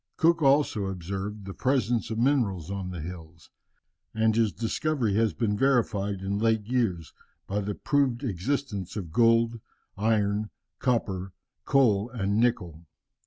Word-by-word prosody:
Cook 165 0 +3
also 135 -7 +3
observed 95 +3 -5
the 95 - -6
presence 120 -3 0
of 110 - -3
minerals 110 - +1
on 95 -2 -4
the 90 -3 -6
hills, 80 -1 -10 0.6
and 110 0 +2
his 115 -2 +2
discovery 120 0 -1
has 110 +1 +2
been 105 0 0
verified 105 -6 +1
in 100 +1 -2
late 110 -1 +1
years 110 -9 -1 0.3
by 100 +1 -2
the 105 0 -3
proved 140 -3 0
existence 105 -2 -3
of 90 -7 -5
gold, 115 +2 +3 0.4
iron, 105 0 +1 0.3
copper, 95 -7 -1 0.3
coal, 115 -6 +3
and 105 -3 -1
nickel. 90 -9 -1
105 Hz, 135 wpm, -27 LUFS, 95-120 Hz, 0.6 s, Cook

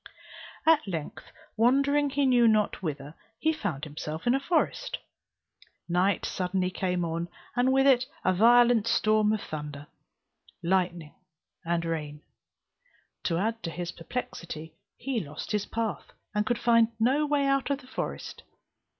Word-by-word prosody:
At 320 -6 +4
length, 165 -6 -6 0.2
wandering 280 +5 +3
he 280 0 +1
knew 245 -3 +5
not 215 -3 +2
whither, 145 -4 -4 0.2
he 315 0 +1
found 155 - -4
himself 155 +1 -6
in 240 - +4
a 270 - +2
forest; 345 - 0 0.9
night 180 +3 +1
suddenly 185 0 -1
came 180 -1 -1
on, 165 +1 -3 0.3
and 250 +1 +3
with 270 +1 +4
it 255 -2 +4 0.2
a 185 - +4
violent 235 +2 +5
storm 215 -2 +3
of 215 -1 -1
thunder, 150 -2 -6 0.8
lightning, 175 -3 0 0.5
and 170 0 -1
rain. 150 -2 -4 1.0
To 165 - +1
add 225 +4 -1
to 165 - -3
his 175 +1 -4
perplexity, 165 -5 -6 0.2
he 265 -4 -2
lost 150 0 -7
his 210 -2 -1
path, 225 -2 -3 0.2
and 210 0 0
could 240 - +1
find 230 -1 +4
no 270 +7 +2
way 290 -1 +2
out 275 0 +1
of 280 - +1
the - - -16
forest. 260 - -5
210 Hz, 145 wpm, -28 LUFS, 170-255 Hz, 1.0 s, knew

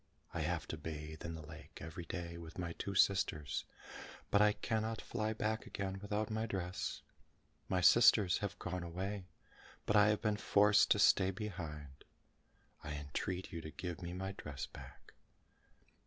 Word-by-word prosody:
I - - -2
have - - -1
to - - -3
bathe 80 0 -6
in 85 - -4
the 80 -2 -8
lake 80 +1 -11
every 85 +1 -7
day 85 0 -5
with 85 -1 -9
my 85 -2 -3
two 100 +3 -4
sisters, 95 -7 +2 0.7
but 100 - +5
I 105 0 +6
cannot 110 0 -1
fly 110 -2 -2
back 110 0 -1
again 95 -1 -3
without 105 +1 -2
my 110 +1 -1
dress. 95 -3 -3 0.7
My 90 -1 +2
sisters 105 -3 +6
have 100 -1 -3
gone 90 0 -3
away, 95 +3 -4 0.6
but 105 - +2
I 105 0 +7
have 105 0 +3
been 105 -1 +2
forced 105 0 +5
to - - +5
stay 95 -2 +5
behind. 80 -9 -6 0.8
I 75 -1 -4
entreat 75 +6 -3
you 85 - -4
to 80 - -7
give 90 +2 -5
me 85 0 -4
my 95 +2 -3
dress 70 -7 -6
back." - - -13
95 Hz, 165 wpm, -36 LUFS, 80-105 Hz, 0.8 s, I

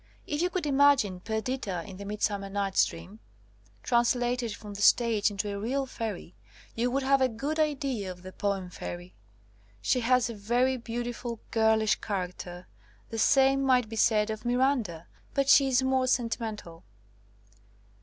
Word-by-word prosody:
If 295 +1 -2
you 355 - +2
could 360 -2 -3
imagine 275 -9 +3
Perdita 220 -3 -3
in 190 -3 -10
the 200 - -8
Mid 210 +1 -5
summer 200 -2 -1
Night 195 -1 -2
^s - - +4
Dream, 85 +6 -11 0.6
translated 240 -1 +1
from 210 -1 -10
the 200 - -7
stage 225 -1 +4
into 205 0 -3
a 200 - -4
real 265 +6 -1
fairy, 220 -8 -6 0.4
you 240 +2 0
would 270 +2 -1
have 275 0 +3
a 260 - +3
good 280 +8 -3
idea 275 -9 -1
of 180 0 -9
the 185 - -8
poem 195 -2 -2
fairy. 175 0 -7 0.7
She 250 - +1
has 250 +1 +2
a 235 - -5
very 240 +5 +1
beautiful 240 -1 -5
girlish 220 -1 +3
character. 180 -2 -5 0.5
The 225 - -3
same 270 +3 +4
might 255 -4 +2
be 225 - -6
said 215 -1 +2
of 215 +1 -6
Miranda, 240 - 0 0.3
but 275 -1 +1
she 275 -1 +7
is 260 0 +2
more 260 -1 +1
sentimental. 225 -8 -2
230 Hz, 165 wpm, -28 LUFS, 200-260 Hz, 0.7 s, she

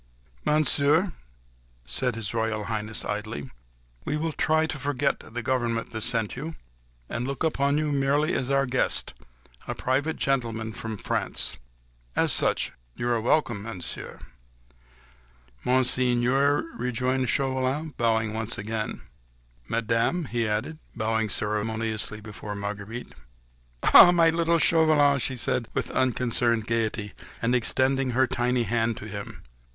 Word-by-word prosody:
"Monsieur," 155 +4 +3 0.7
said 125 - 0
His 110 -2 -4
Royal 110 -2 -1
Highness 110 0 -3
coldly, 105 -10 -4 0.5
"we 150 - -1
will 160 +1 -1
try 155 +1 +2
to 155 -2 -5
forget 140 +1 0
the 120 +1 -7
government 120 -2 -1
that 110 - -4
sent 115 -2 0
you, 155 +5 -6 0.5
and 120 +2 -3
look 140 +2 -3
upon 140 -2 +1
you 150 -1 0
merely 145 +3 +2
as 130 - -1
our 140 0 +3
guest—a 60 - -3
private 140 +5 0
gentleman 115 -5 -1
from 110 +2 -5
France. - - -1 0.6
As - - +3
such - - +1 0.2
you 120 - -2
are 120 -2 +1
welcome, 120 -4 +1
Monsieur." 100 -5 -7 1.5
"Monseigneur," 130 +2 +3
rejoined 125 +1 0
Chauvelin, 135 +4 0
bowing 110 -2 +1
once 110 +1 -1
again. 110 +1 -4 0.7
"Madame," 115 +9 0
he 115 -2 -1
added, 110 +9 -2 0.2
bowing 110 0 0
ceremoniously 110 +1 -1
before 105 -1 -7
Marguerite. 100 +3 -6 0.8
"Ah! 175 - +11
my 165 -2 +5
little 170 0 +2
Chauvelin!" 155 -4 +4
she 130 +2 -2
said 120 -1 0
with - - -2
unconcerned 120 -3 +1
gaiety, 110 -2 -1 0.3
and 115 +2 +1
extending 130 +2 +2
her 130 - +5
tiny 125 0 0
hand 115 +1 0
to - - -8
him. 100 -1 -7
120 Hz, 125 wpm, -26 LUFS, 110-140 Hz, 1.5 s, Ah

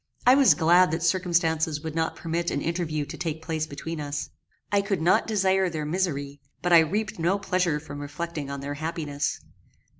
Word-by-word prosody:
I 250 - +8
was 275 -1 +6
glad 175 +2 +5
that 165 +1 -2
circumstances 165 -4 +1
would 160 -1 -4
not 160 0 -1
permit 170 +1 -2
an - - -1
interview 160 -2 -2
to - - -8
take 160 -2 -4
place 160 -1 -2
between 155 +2 -6
us. 145 0 -4 0.4
I 200 -1 +3
could 200 -1 -1
not 170 +3 +3
desire 190 -3 +2
their 155 -3 -4
misery; 145 -5 -2 0.2
but 175 0 +2
I 170 - +10
reaped 195 +5 -1
no 175 +4 +2
pleasure 180 -5 0
from 145 -2 -9
reflecting 150 0 -5
on 140 0 -5
their 140 +1 -4
happiness. 150 -2 -3
165 Hz, 185 wpm, -26 LUFS, 150-180 Hz, 0.4 s, I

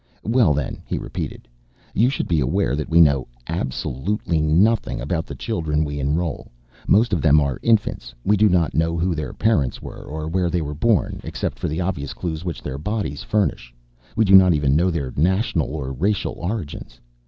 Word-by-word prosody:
"Well, 115 - +3
then," 70 - -3
he - - -2
repeated, - - -6 0.5
"you 120 +4 +3
should 135 - -2
be 85 -3 +2
aware 70 -1 +1
that 75 0 -4
we 85 0 +4
know 70 -5 +4 0.2
absolutely 80 +3 -2
nothing 90 +10 +2
about 80 +5 -2
the - - -7
children 75 -2 -1
we 75 0 -4
enroll. 75 +2 -2 0.4
Most 110 +2 +4
of 90 - +1
them 75 -1 +5
are 70 -4 -1
infants. 105 - +1
We 105 - +4
do 105 +1 +4
not 90 -3 +2
know 85 +1 +1
who 85 +2 +1
their 75 -1 -4
parents 90 - +1
were, - - -9
or 80 +1 -6
where 90 +1 0
they 85 -1 -1
were 75 0 -4
born. 105 +8 +1
Except - - -4
for - - -2
the 80 +4 -2
obvious 85 -6 -3
clues 80 -2 -4
which 85 -3 -5
their 65 - -5
bodies 100 -5 -3
furnish, 90 - -1 0.4
we 110 - +3
do 95 - +3
not 95 -3 +8
even 70 -2 +2
know 90 +4 +3
their 70 -7 -3
national 95 - +1
or 70 -4 -4
racial 95 +10 0
origins. 85 - -5
80 Hz, 190 wpm, -22 LUFS, 75-95 Hz, 0.5 s, not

